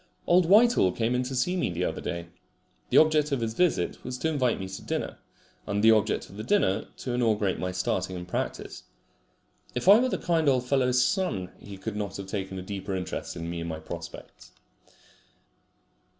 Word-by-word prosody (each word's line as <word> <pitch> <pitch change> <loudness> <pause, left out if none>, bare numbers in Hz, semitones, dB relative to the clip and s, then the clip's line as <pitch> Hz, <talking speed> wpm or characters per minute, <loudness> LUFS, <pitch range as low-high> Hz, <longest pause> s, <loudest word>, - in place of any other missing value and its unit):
Old 175 -1 +4
Whitehall 210 - +5
came 115 +1 0
in 125 - +1
to 130 +1 -4
see 180 +9 +1
me 180 - 0
the 90 +1 -2
other - - -3
day. 85 -1 -4 0.6
The - - +3
object 155 -1 +4
of 140 - +1
his 110 -1 -2
visit 180 +7 0
was 125 - -5
to 160 - -1
invite 130 -6 +1
me 95 - -4
to 95 - -7
dinner, - - -4 0.5
and 100 +1 -1
the 115 - +8
object 110 -2 +1
of 100 - -13
the 110 - -5
dinner 110 - +1
to 130 - -5
inaugurate 110 -5 +1
my 90 0 -2
starting 95 0 -2
in 90 0 -6
practice. 90 - -4 0.9
If 125 - -3
I 205 +3 +9
were 255 +1 +2
the - - -1
kind 165 -4 +1
old 130 -2 +2
fellow's 125 -1 +3
son 150 - -1
he 100 -1 -10
could 105 +2 -5
not 100 -2 -4
take 95 -1 -4
a 95 -1 -5
deeper 95 0 -4
interest 90 -1 -4
in 85 -1 -5
me 85 0 -4
and 85 0 -4
my 80 - -4
prospects. 80 - -10
110 Hz, 195 wpm, -27 LUFS, 95-145 Hz, 0.9 s, I